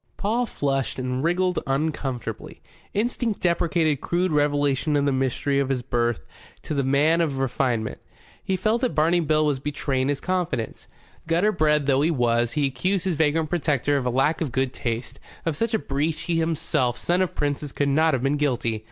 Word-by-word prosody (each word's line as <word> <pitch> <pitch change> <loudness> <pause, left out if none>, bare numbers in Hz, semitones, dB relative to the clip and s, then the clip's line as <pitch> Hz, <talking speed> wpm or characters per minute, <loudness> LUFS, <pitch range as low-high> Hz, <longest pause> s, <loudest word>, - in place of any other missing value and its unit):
Paul 235 +4 0
flushed 135 - -1
and 130 +1 -2
wriggled 180 +2 +1
uncomfortably. 135 -5 -3 0.3
Instinct 230 0 -1
deprecated 165 -4 +1
crude 180 +1 0
revelation 145 0 +1
of 145 -1 +2
the 140 - +2
mystery 135 +2 0
of 135 -1 0
his 130 -2 -1
birth 120 - -1 0.4
to - - -4
the 140 -2 0
man 145 +5 +3
of 145 -5 -1
refinement. 125 -4 -1 0.4
He 190 - -1
felt 215 +6 +1
that 250 - 0
Barney 165 +3 +3
Bill 155 -1 +2
was 145 -3 0
betraying 140 -2 -1
confidence. 175 -7 -3 0.4
Gutter 175 +6 +3
bred 150 -5 +2
though 135 -1 +3
he 155 - +3
was, 120 -5 +1
he 150 -2 +1
accused 170 +9 -1
his 185 - +1
vagrant 155 0 +1
protector 145 -5 +1
of 130 -3 0
a - - +2
lack 135 +7 +1
of 150 -6 -1
good 130 +1 0
taste. 120 +2 -4 0.3
Of 165 -2 0
such 230 +7 0
a - - +4
breach 155 -1 -2
he 170 -2 0
himself, 160 -6 0
son 175 +2 +1
of 185 - -1
princes, 145 -1 -2
could 145 - 0
not 155 +1 +3
have 125 - -3
been 140 +2 +1
guilty. 120 -6 0
145 Hz, 185 wpm, -24 LUFS, 135-165 Hz, 0.4 s, a